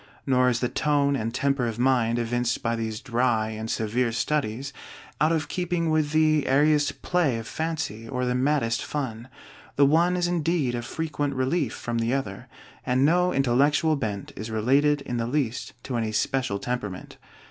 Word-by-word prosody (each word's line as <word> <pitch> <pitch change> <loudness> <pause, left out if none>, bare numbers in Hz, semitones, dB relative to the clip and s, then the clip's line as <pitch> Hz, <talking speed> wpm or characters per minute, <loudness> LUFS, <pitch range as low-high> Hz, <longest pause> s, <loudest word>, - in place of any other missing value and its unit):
Nor 125 -2 +3
is 115 -2 -1
the 125 - +2
tone 140 +1 +1
and 115 -3 -2
temper 135 -1 0
of 115 -1 -4
mind 120 -2 +2
evinced 120 +1 -1
by 115 0 0
these 110 -1 -4
dry 120 -3 +1
and 110 0 -5
severe 115 +3 0
studies 130 +2 -2 0.5
out 155 +2 +4
of 160 -2 0
keeping 170 0 -1
with 155 -2 +2
the 155 -1 +3
airiest 145 +2 +2
play 165 -9 +1
of 115 - -6
fancy 150 -9 -4
or 125 -1 -1
the 125 - 0
maddest 125 -3 +1
fun. 125 -5 -4 0.5
The 140 - +5
one 170 +5 +3
is 175 -1 +1
indeed 165 -6 0
a 120 - -2
frequent 145 +2 -3
relief 130 0 0
from 120 -1 -3
the 115 +3 +1
other, 100 -8 -4 0.4
and 130 +2 +2
no 180 +3 +3
intellectual 140 +5 +2
bent 105 -8 -4
is 110 +3 -6
related 140 +7 +2
in 125 -3 -4
the 115 0 -1
least 130 -2 -2
to 125 -2 -3
any 110 -2 -2
special 125 -3 0
temperament. 105 -5 -5
130 Hz, 175 wpm, -25 LUFS, 115-150 Hz, 0.5 s, The